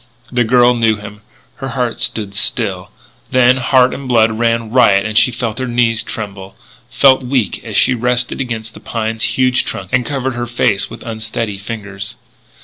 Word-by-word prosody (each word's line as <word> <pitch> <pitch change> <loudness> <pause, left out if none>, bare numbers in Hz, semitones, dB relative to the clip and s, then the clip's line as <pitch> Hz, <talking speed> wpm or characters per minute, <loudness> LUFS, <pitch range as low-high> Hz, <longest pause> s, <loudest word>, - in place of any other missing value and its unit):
The 125 -1 +2
girl 120 +1 +4
knew 115 -2 +2
him. 105 0 -10 0.4
Her 135 - -5
heart 125 -1 -2
stood 110 -5 -2
still; 100 -3 -1 0.4
then 130 0 +4
heart 130 -1 +3
and 135 -1 -7
blood 115 -3 +3
ran 115 0 -1
riot 105 -6 +4
and 110 0 -4
she 120 - +5
felt 120 0 -4
her 130 - -2
knees 120 -2 +1
tremble, 100 -3 -6 0.3
felt 135 -1 +4
weak 125 -3 -1
as 110 -3 -3
she 130 - +4
rested 125 +2 -1
against 115 -3 -5
the - - -12
pine's 110 -1 -4 0.2
huge 130 0 +3
trunk 95 -1 -5
and 125 0 +3
covered 130 -1 -2
her 120 0 -4
face 100 -4 +1
with - - -10
unsteady 110 -2 -4
fingers. 100 -1 -6
115 Hz, 175 wpm, -16 LUFS, 110-125 Hz, 0.4 s, she